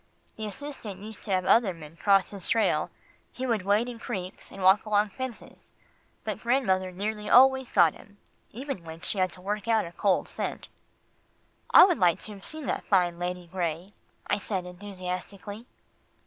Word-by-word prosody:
The 215 -1 -5
assistant 220 -5 -7
used 215 0 -9
to - - -9
have 185 -1 +1
other 205 -5 +4
men 155 -1 -12
cross 195 +1 +3
his 200 -4 -6
trail, 225 -1 +2 0.4
he 260 - -5
would 230 -5 +1
wade 205 +5 +2
in 240 -2 -7
creeks, 190 -6 -6
and 195 - -8
walk 190 +2 +6
along 210 0 +2
fences, 260 0 -8 0.5
but - - -3
grandmother 190 -7 +1
nearly 210 +3 -4
always 265 0 +6
got 170 -5 +5
him, 205 0 -17 0.3
even 260 -4 -6
when 165 0 -9
she 190 +2 -3
had 185 -1 +2
to 180 - -11
work 205 +3 -3
out 225 -4 +3
a 170 - -8
cold 190 +1 +1
scent." - - -5 1.0
"I - - +10
would 360 -3 +1
like 175 -2 +4
to 215 - -6
have 195 -1 -12
seen 310 -2 -5
that - - -2
fine 175 -3 +2
Lady 180 0 -3
Gray," 175 +1 -3 0.3
I - - 0
said 190 -3 -3
enthusiastically. 195 +3 -7
200 Hz, 175 wpm, -28 LUFS, 180-225 Hz, 1.0 s, I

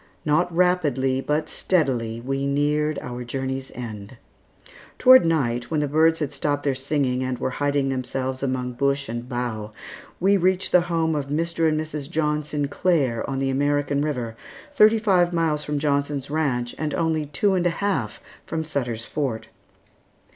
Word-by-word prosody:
Not 155 +4 +2
rapidly, 150 -7 +1
but 150 +3 -1
steadily, 125 -13 0
we 135 +3 -2
neared 150 +2 +1
our 125 0 -5
journey's 130 +2 -4
end. 110 -1 -7 0.8
Toward 255 -8 +7
night, 125 -7 0
when 155 - 0
the 150 - 0
birds 160 +3 +3
had 150 -3 -3
stopped 145 0 -1
their 140 - +1
singing 135 -1 -1
and 130 -1 -2
were 130 - -2
hiding 140 -1 +1
themselves 130 0 -3
among 130 -2 -1
bush 140 +2 0
and 120 +2 -5
bough, 115 -4 -4 0.5
we 195 +3 +4
reached 185 +1 +1
the 180 - +6
home 165 -1 +1
of 145 -2 -2
Mr. 165 +2 +1
and 155 0 0
Mrs. 155 -2 -5
John 150 -3 0
Sinclair 145 -3 0
on 135 - -2
the 135 0 0
American 145 +1 +1
River, 125 -7 -2 0.4
thirty 220 -4 +6
five 185 -5 +2
miles 160 -3 0
from 150 0 -2
Johnson's 140 -1 -1
Ranch 130 -6 -1
and 155 -1 -2
only 160 -2 0
two 170 +8 +1
and 180 -1 +2
a - - +3
half 165 - -2 0.2
from 160 0 -3
Sutter's 120 -7 -3
Fort. 115 -7 -3
145 Hz, 160 wpm, -24 LUFS, 130-160 Hz, 0.8 s, Toward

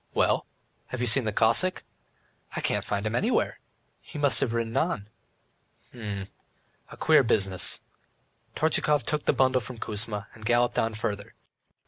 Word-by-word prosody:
"Well, - - +2 0.4
have 130 - -5
you 125 - +1
seen 120 +1 +2
the 110 - 0
Cossack?" 115 - +3 0.7
"I - - -1
can't - - 0
find 100 0 -2
him 110 - -1
anywhere, 220 - +1 0.4
he 155 - -10
must 145 -2 +3
have 120 - 0
ridden 115 -1 -2
on." 110 - 0 0.8
"H'm... 105 -5 -5 0.6
a - - -11
queer 155 -2 +5
business." 95 -6 +1 0.7
Tortchakov 150 -3 +2
took 150 -1 -2
the - - +4
bundle 130 -1 +3
from 120 +2 -7
Kuzma, 105 -1 -3
and 110 - -14
galloped 120 +2 +2
on 115 -1 0
farther. 100 -2 -4
115 Hz, 150 wpm, -27 LUFS, 105-135 Hz, 0.8 s, queer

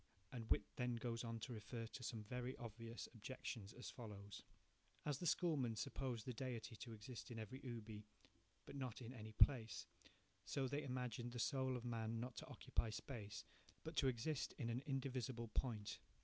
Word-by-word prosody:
"2 - - -5
And 115 -2 -3
Whytt - - +6
then 125 -1 +3
goes 115 0 0
on 115 -1 -1
to 125 - -2
refer 115 +1 -2
to 115 - -6
some 115 -2 -1
very 125 +3 -1
obvious 115 0 -4
objections 115 -2 -3
as 125 - -4
follows:– 105 -5 -6 0.6
"As 145 -2 +2
the 175 - +1
schoolmen 145 -10 +4
supposed 125 -1 0
the 125 - 0
Deity 120 -1 -2
to 115 - -5
exist 115 +3 -5
in 120 - -4
every 110 +5 -4
ubi, 110 -4 -4 0.6
but - - -6
not 130 -5 -1
in 120 +2 -4
any 110 -3 -6
place, 115 0 +6 0.6
so 135 -2 +2
they 140 +3 +1
imagined 125 -3 -1
the 120 - -2
soul 130 +1 +3
of 120 - -5
man 115 -1 +1
not 125 +1 -2
to - - -3
occupy 115 - +1
space, 105 -4 -3 0.4
but 160 +1 -3
to 135 - +7
exist 130 +4 +2
in 120 -4 +1
an 120 +2 +1
indivisible 130 -4 +1
point. 110 -3 +1
120 Hz, 180 wpm, -46 LUFS, 110-130 Hz, 0.6 s, to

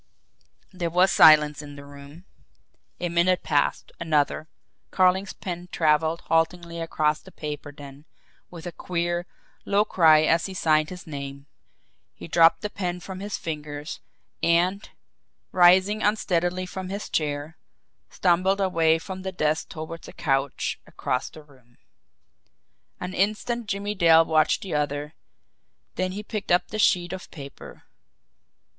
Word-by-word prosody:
There 175 -2 -2
was 180 +3 +3
silence 150 -1 +6
in 145 -1 -10
the 140 0 -11
room. 140 +4 -13 0.7
A 175 - -1
minute 175 +2 +2
passed 145 -2 0
another. 155 -1 0 0.4
Carling's 190 +1 +2
pen 175 -1 -7
travelled 160 +1 +1
haltingly 170 +1 -1
across 155 -2 0
the - - -16
paper 150 -1 -6
then, 140 0 -12 0.4
with 170 -1 -11
a 175 - -4
queer, 175 0 -3 0.4
low 205 +1 +2
cry 160 -6 +5
as 165 +3 +2
he 190 - -8
signed 155 -3 +2
his 180 -1 -9
name, 140 -2 -7 0.7
he - - -10
dropped 165 0 +4
the 210 - -2
pen 180 -2 -3
from 185 +1 -8
his 205 +1 -4
fingers, 150 -2 -6 0.4
and, 180 +4 +1 0.6
rising 185 +4 +5
unsteadily 185 -4 0
from 185 0 -7
his 200 +2 -5
chair, 150 +1 -2 0.5
stumbled 185 +2 +2
away 165 -4 +3
from 190 +3 -7
the 190 0 -4
desk 155 -3 -1
toward 160 +1 -8
a - - -11
couch 135 -2 -1
across 125 - -3
the 155 - -13
room. 130 -5 -24 1.2
An 180 +1 -5
instant 215 +4 -1
Jimmie 205 0 -2
Dale 165 -4 +5
watched 155 -1 +2
the 190 - -5
other, 145 0 -2 0.8
then 185 0 -2
he 205 +2 -6
picked 215 -3 -5
up 175 - +3
the 215 - -5
sheet 180 -3 +2
of 190 - -8
paper. 140 -4 -11
170 Hz, 140 wpm, -25 LUFS, 150-185 Hz, 1.2 s, silence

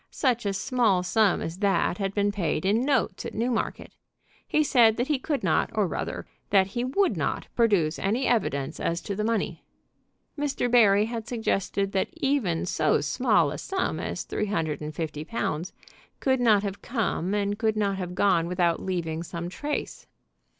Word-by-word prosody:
Such 240 -6 0
a 200 - 0
small 205 -3 +1
sum 200 +1 +2
as 165 +3 -5
that 195 -2 +1
had 195 -1 -2
been 205 0 +2
paid 180 -4 -1
in 210 +4 +3
notes 265 -9 0
at - - -6
Newmarket. 235 +1 -2 0.5
He 305 - +2
said 235 -6 +4
that 245 +4 -1
he 295 -3 +1
could 280 -2 -2
not, - - +2
or, - - +2
rather, - - -4 0.2
that 195 -2 +5
he 240 - -1
would 330 +11 +1
not, - - -2
produce 200 -9 +2
any 225 +7 0
evidence 140 - 0
as 170 0 -1
to 200 - -4
the 210 - -2
money. 225 0 -1 0.7
Mr. 285 -4 -1
Barry 210 -4 +5
had 225 -1 -5
suggested 200 -4 -1
that 190 -1 0
even 270 - 0
so 155 -3 +2
small 170 - +2
a 150 - -5
sum 385 -1 -2
as - - -4
three 210 - -3
hundred 160 -7 -2
and 150 0 -6
fifty 155 -2 -4
pounds 180 -3 -3 0.5
could 260 -1 +1
not 215 -4 +4
have 200 -1 -4
come 210 -5 -1
and 205 0 -1
could 220 -1 +1
not 200 -2 0
have 180 -1 -5
gone 180 -4 +3
without 175 -1 +1
leaving 170 -4 -2
some 170 0 -5
trace. 290 +10 -4
205 Hz, 180 wpm, -26 LUFS, 175-240 Hz, 0.7 s, that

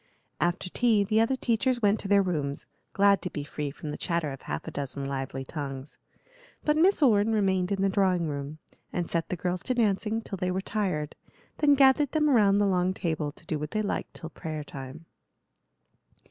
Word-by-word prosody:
After 175 +2 0
tea 220 +1 +2
the 215 +2 +2
other 230 +4 +2
teachers 245 0 +1
went 205 +1 +3
to - - -5
their 200 0 +4
rooms, 145 -6 -2 0.3
glad 200 0 +4
to 180 - -4
be 145 -3 -5
free 145 0 -4
from 150 +1 -7
the - - -6
chatter 170 -4 -1
of 135 - -8
half 75 0 -5
a - - -4
dozen 140 0 -4
lively 135 -1 -4
tongues; 135 -1 -7 0.7
but 300 - +3
Miss 340 +1 +4
Orne 220 -4 +4
remained 190 -3 +1
in 195 -1 0
the - - +4
drawing 190 -3 +2
room, 145 +1 -5 0.3
and 175 -2 -2
set 170 -1 -1
the - - -1
girls 180 +1 -2
to 255 - -2
dancing 220 -1 +1
till 195 - -5
they 180 -1 0
were 185 +1 -1
tired, 190 -7 -2 0.5
then 290 -2 +5
gathered 275 +1 +4
them 300 -2 +3
round 205 -5 +4
the 205 - +3
long 185 -1 +1
table 160 -5 -2
to - - -19
do 155 -2 -2
what 150 0 -4
they 215 +3 -1
liked 205 - -3
till 165 -1 -7
prayer 155 -1 -5
time. 140 +3 -9
185 Hz, 200 wpm, -28 LUFS, 150-215 Hz, 0.7 s, then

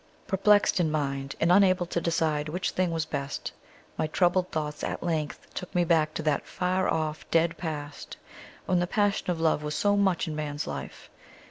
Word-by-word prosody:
Perplexed 205 0 +3
in 165 -3 +2
mind 140 -2 -2
and 165 +2 +3
unable 185 -1 +5
to 170 0 -2
decide 155 -3 0
which 180 +4 -2
thing 185 -1 0
was 165 -1 -1
best, 140 -2 -4 0.5
my - - +1
troubled 180 +3 +2
thoughts 150 -1 -3
at - - -3
length 160 -4 -2
took 180 - -7
me 175 - +4
back 160 -2 +2
to 160 - -3
that 150 -2 0
far 185 +1 0
off 155 -1 -2
dead 165 0 +2
past, 150 -4 -6 0.5
when 180 -1 +2
the 175 - 0
passion 205 -1 +1
of 175 -2 0
love 160 -2 +2
was 150 0 -3
so 205 0 +2
much 190 -5 +2
in 155 - -4
man's 150 0 -3
life. - - -7
165 Hz, 190 wpm, -27 LUFS, 150-180 Hz, 0.5 s, unable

